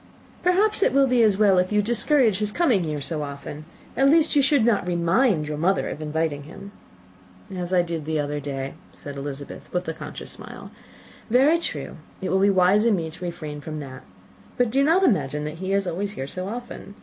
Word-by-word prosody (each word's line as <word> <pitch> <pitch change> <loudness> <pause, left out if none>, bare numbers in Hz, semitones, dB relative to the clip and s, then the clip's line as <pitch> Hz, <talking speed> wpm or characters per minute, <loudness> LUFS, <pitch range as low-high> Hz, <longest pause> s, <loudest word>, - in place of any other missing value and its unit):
"Perhaps 400 +4 +2
it - - +3
will 275 0 +5
be 250 -2 +2
as 210 -4 +4
well 200 -3 +4
if 180 +2 0
you 210 0 +2
discourage 240 -2 +3
his 210 -1 -1
coming 240 - +2
here 150 -2 -3
so 155 +2 -4
very 145 -1 -3
often. 145 +2 -9 0.3
At 270 +1 +4
least 320 +1 +4
you 285 - +5
should 275 -3 +3
not 210 -6 +2
remind 170 - +2
your 150 -1 -4
mother 190 +4 +1
of 155 - -6
inviting 155 -1 -2
him." 185 +7 -11 0.8
"As 180 -1 -4
I 180 -2 +3
did 165 -3 -4
the 155 0 -1
other 145 0 -2
day," 135 -1 -5 0.2
said 145 -1 -9
Elizabeth, 140 0 -7
with 180 -1 -2
a 160 - -2
conscious - - -7
smile; - - -9 0.6
"very 275 +8 +4
true, - - -5 0.2
it 190 - -3
will 190 - +3
be 200 +1 +4
wise 190 +2 +4
in 230 -3 +4
me 165 -3 -3
to 175 +3 -11
refrain 155 -4 -6
from 155 +1 -6
that. 130 -2 -9 0.6
But 245 -3 +2
do 270 +3 +3
not 335 +6 +3
imagine 150 - +1
that 150 +2 -6
he 190 0 -3
is 200 0 +1
always 195 +4 -3
here 135 - -5
so 185 +6 -5
often. 230 -2 -8
185 Hz, 215 wpm, -24 LUFS, 155-235 Hz, 0.8 s, will